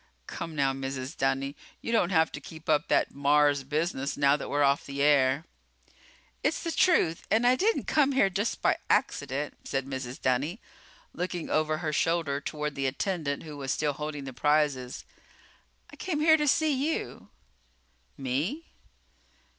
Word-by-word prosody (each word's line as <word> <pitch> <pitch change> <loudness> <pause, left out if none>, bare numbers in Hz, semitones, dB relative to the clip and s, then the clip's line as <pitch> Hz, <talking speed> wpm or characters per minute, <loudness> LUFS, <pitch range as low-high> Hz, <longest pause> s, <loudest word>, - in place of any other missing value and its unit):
"Come, 165 - -6
now, 135 -2 +2
Mrs. 135 +1 -5
Dunny. 135 +1 -1 0.2
You - - -5
don't 225 -7 +3
have 160 -4 +3
to 145 - -7
keep 160 +2 -12
up 150 0 +2
that - - +2
Mars 145 0 +3
business 145 -1 -2
now 140 0 +4
that 150 - -5
we're 145 0 +2
off 140 0 +3
the 140 0 -6
air." 140 +1 +3 1.0
"It's - - 0
the 335 - -2
truth 320 - +2
and 225 +2 +3
I 250 +1 +6
didn't 430 - +1
come 280 -2 +3
here 260 -7 +4
just 205 +5 -2
by - - +3
accident," 140 +1 0
said 135 -1 -2
Mrs. 130 -2 -5
Dunny, 140 - 0 0.5
looking 180 -1 -4
over 155 0 +1
her 155 -1 -3
shoulder 160 -3 0
toward 150 0 -3
the 135 -1 -1
attendant 145 0 -2
who 150 -2 -8
was 135 -2 -3
still 150 -1 0
holding 150 0 -5
the 135 -1 -7
prizes. 145 -3 0 0.9
"I - - -11
came 340 -6 -2
here 315 +1 +6
to 300 -1 0
see 310 +2 +3
you." 285 +4 -3 0.9
"Me?" 145 - -2
150 Hz, 160 wpm, -28 LUFS, 140-180 Hz, 1.0 s, I